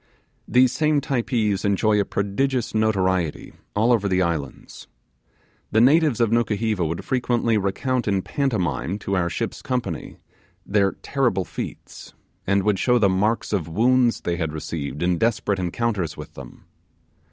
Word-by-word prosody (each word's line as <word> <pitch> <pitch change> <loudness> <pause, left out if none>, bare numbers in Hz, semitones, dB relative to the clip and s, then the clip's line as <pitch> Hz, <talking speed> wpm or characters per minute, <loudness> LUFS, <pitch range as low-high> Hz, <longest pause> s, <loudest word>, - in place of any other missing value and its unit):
These 125 0 +4
same 155 0 +2
Typees 120 -7 -1
enjoy 105 +1 +2
a 100 - +1
prodigious 120 +7 -1
notoriety 95 -7 0 0.2
all 110 +4 +3
over 105 -4 +1
the 95 0 +2
islands. 80 -6 -5 0.8
The 110 - +3
natives 140 +1 +4
of 115 -2 +2
Nukuheva 110 -4 +1
would 80 +1 -3
frequently 120 -3 +1
recount 110 +5 -1
in 100 -2 +1
pantomime 95 - -1
to 100 -1 -3
our 85 -2 +1
ship's - - -4
company 120 -11 -4 0.5
their 100 -1 +2
terrible 120 -10 0
feats, - - -8 0.3
and 100 +1 +2
would 105 -2 +1
show 125 -1 +3
the 105 -4 +3
marks 105 +5 0
of 90 -6 -1
wounds 120 +7 +2
they 85 -1 -2
had 80 -3 -2
received 75 -1 -4
in 90 -1 +1
desperate 110 -3 0
encounters 95 -2 -2
with - - -9
them. 70 -3 -12
105 Hz, 145 wpm, -23 LUFS, 95-120 Hz, 0.8 s, These